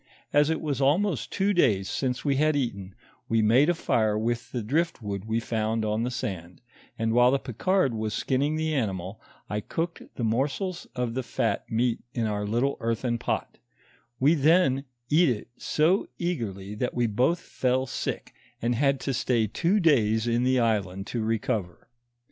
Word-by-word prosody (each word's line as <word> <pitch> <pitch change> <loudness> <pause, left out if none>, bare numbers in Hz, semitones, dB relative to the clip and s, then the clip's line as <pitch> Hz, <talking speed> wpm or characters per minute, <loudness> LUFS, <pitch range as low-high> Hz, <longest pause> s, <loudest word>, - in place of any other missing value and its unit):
As 145 +1 +4
it 160 - -1
was 145 -4 -2
almost 160 +4 +1
two 200 +1 +1
days 105 - +3
since 125 +3 -2
we 140 -2 +2
had 155 +1 +3
eaten, 100 -8 -3 0.3
we 115 -1 +3
made 125 +9 +5
a 175 - +2
fire 110 -8 +1
with 120 +2 -2
the 120 -3 -3
drift 150 +2 -1
wood 100 -1 -4
we 110 +1 0
found 110 -1 -1
on 105 +1 0
the 120 - 0
sand; 90 -8 -5 0.4
and 115 0 0
while 120 +1 +6
the 135 - +3
Picard 140 - 0
was 110 -1 -2
skinning 140 +3 0
the 160 0 -1
animal, 100 - -2 0.3
I 105 - -2
cooked 170 - -3
the 120 - -4
morsels 140 - -1
of 125 -2 -2
the 130 - -1
fat - - -2
meat 115 +1 +1 0.2
in 115 -2 0
our 105 -1 -2
little 120 +6 0
earthern 115 +1 -1
pot; - - -3 0.6
we 145 +5 +5
then 150 -3 +3 0.3
eat 165 +1 +5
it 115 -2 -3
so 165 +6 +1
eagerly 105 - -3
that 125 +4 -3
we 120 -1 +2
both 125 +10 +1
fell 130 -5 0
sick, 125 - -4 0.3
and 120 +1 0
had 135 +2 +2
to 135 - -1
stay 120 -2 +1
two 170 - +1
days 110 - +3
in 120 +1 +1
the 130 0 +3
island 100 -5 0
to 120 - -1
recover. 110 -4 -2
120 Hz, 175 wpm, -27 LUFS, 110-145 Hz, 0.6 s, while